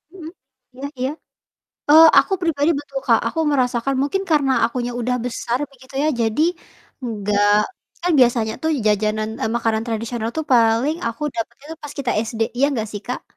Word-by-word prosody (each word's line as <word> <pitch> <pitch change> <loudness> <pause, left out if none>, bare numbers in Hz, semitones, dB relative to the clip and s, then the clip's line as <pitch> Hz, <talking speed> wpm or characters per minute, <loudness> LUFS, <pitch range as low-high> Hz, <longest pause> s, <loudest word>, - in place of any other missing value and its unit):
Mhm, 325 -3 -9 0.4
iya 270 +2 -7
iya. 260 +1 0 0.8
Oh, 320 +2 +9
aku 390 - +3
pribadi 320 -2 +1
betul 280 -2 -6
Kak, 230 -2 +4
aku 325 - -6
merasakan, 250 -1 0
mungkin 340 +8 -1
karena 285 -4 +3
akunya 240 +1 -2
udah 250 +1 0
besar 240 0 -2
begitu 260 0 -18
ya. 305 - +2
Jadi, 225 +7 +1 0.6
enggak 205 -1 +2 0.4
kan 355 - +2
biasanya 235 -3 +3
tuh 320 - +1 0.2
jajanan 215 +1 +1
eee, 220 - 0
makanan 225 -2 0
tradisional 230 0 -3
tuh 315 - -1
paling 235 +6 +3
aku 230 +5 -7
dapatnya 235 +4 -5
tuh 320 - -10
pas 290 -1 -7
kita 255 -3 -1 0.2
SD, 225 -1 -7 0.2
iya 275 - +3
nggak 220 -5 -2
sih, 205 - -5
Kak? 250 - -4
245 Hz, 170 wpm, -20 LUFS, 225-280 Hz, 0.8 s, Oh